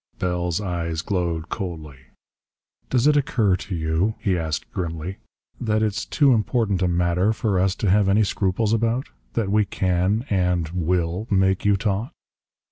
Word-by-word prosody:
Bell's 90 -1 -1
eyes 85 -4 -3
glowed 85 -4 -2
coldly. 80 - -6 0.9
"Does 125 0 +2
it 150 0 +5
occur 115 -9 +2
to 95 -1 -6
you," 80 +6 0
he 105 -4 0
asked 80 -3 -3
grimly, 85 +1 -4 0.4
"that 110 -2 +1
it's 105 -2 -2
too 140 -4 +4
important 110 -4 +1
a 90 - +3
matter 90 +3 +2
for 105 -4 0
us 95 0 +2
to 105 - -1
have 100 0 +4
any 105 +3 +4
scruples 105 +2 0
about? 115 +3 0 0.2
That 105 -4 -1
we 105 0 +4
can 95 +4 0
and 90 -4 +1
will 90 +3 -1
make 95 -1 +2
you 100 -1 +4
talk?" 105 +2 -2
95 Hz, 155 wpm, -23 LUFS, 85-110 Hz, 0.9 s, it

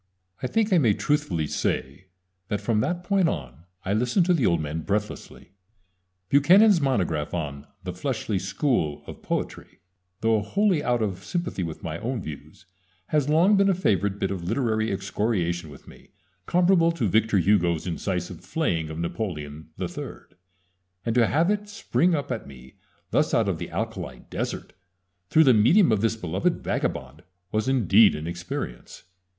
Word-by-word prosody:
I 130 - -1
think 220 - +1
I 180 - +6
may 115 -8 +3
truthfully 145 - 0
say 70 +4 -3 0.4
that 105 - -2
from 115 -3 0
that 175 +9 -1
point 195 -3 +2
on 70 +2 -6 0.2
I 95 - 0
listened 125 - +2
to 180 - +3
the 145 -9 +2
old 85 -2 +2
man 75 +1 -3
breathlessly. 105 -1 -4 0.8
Buchanan's 180 +7 +6
monograph 90 - 0
on 75 -3 -5 0.2
"The 90 -1 -4
Fleshly 110 -1 -2
School 95 - -1
of - - -10
Poetry" - - -4 0.4
though 110 -1 +2
wholly 190 - +1
out 120 -2 +1
of 95 -4 -3
sympathy 175 - -3
with 80 -3 -5
my 85 0 -4
own 120 +2 -3
views 80 -7 -9 0.4
has 150 -2 +1
long 170 +7 +5
been 200 0 +4
a 190 - +3
favorite 100 - +1
bit 95 - -1
of 95 -3 -4
literary 110 +2 0
excoriation 95 -4 -1
with 70 - -14
me, - - -16 0.4
comparable 175 -1 +4
to 135 -10 -1
Victor 110 +1 +2
Hugo's 90 -3 +2
incisive 90 0 -3
flaying 85 - -1
of 80 - -6
Napoleon 80 -4 -5
III, 145 -6 -5 0.9
and 115 - 0
to 120 -1 +4
have 165 +6 +2
it 210 0 -2
spring 180 -4 +1
up 145 -3 -3
at 115 - -4
me 65 -2 -14 0.3
thus - - +2
out - - +2
of - - -1
the - - -5
alkali - - -4
desert, - - -4 0.6
through 160 - +6
the 130 -4 +6
medium 120 - +5
of 105 -2 +2
this 115 0 +1
beloved 90 -8 -1
vagabond, 65 +4 -3 0.3
was 110 +2 0
indeed 110 -5 +5
an 75 - -5
experience. 85 -8 -6
110 Hz, 165 wpm, -25 LUFS, -, 0.9 s, I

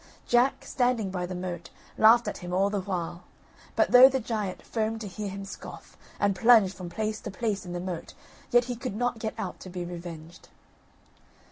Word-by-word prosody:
Jack, 245 +3 +2
standing 245 -6 0
by 180 -2 -3
the 185 - -5
moat, 180 -1 -5 0.3
laughed 230 +2 +6
at - - -4
him 175 0 -7
all 195 +2 +2
the 205 -2 -1
while; 180 -3 -4 0.5
but - - +2
though 250 +1 +10
the 265 0 0
giant 215 -5 -3
foamed 225 0 -2
to 210 - -5
hear 205 +1 -5
him 195 +1 -6
scoff, 195 - -10 0.2
and 200 -1 +2
plunged 220 -2 +6
from 180 -3 -8
place 215 +3 -3
to - - -6
place 200 -1 -2
in 175 - -5
the 175 - -3
moat, 175 -2 -6 0.3
yet 240 0 +5
he 245 -1 -3
could 245 -3 -5
not 245 0 -1
get 220 -1 -3
out 185 - -5
to 185 - -9
be 175 -1 -5
revenged. 170 -1 -9
200 Hz, 200 wpm, -28 LUFS, 180-230 Hz, 0.5 s, though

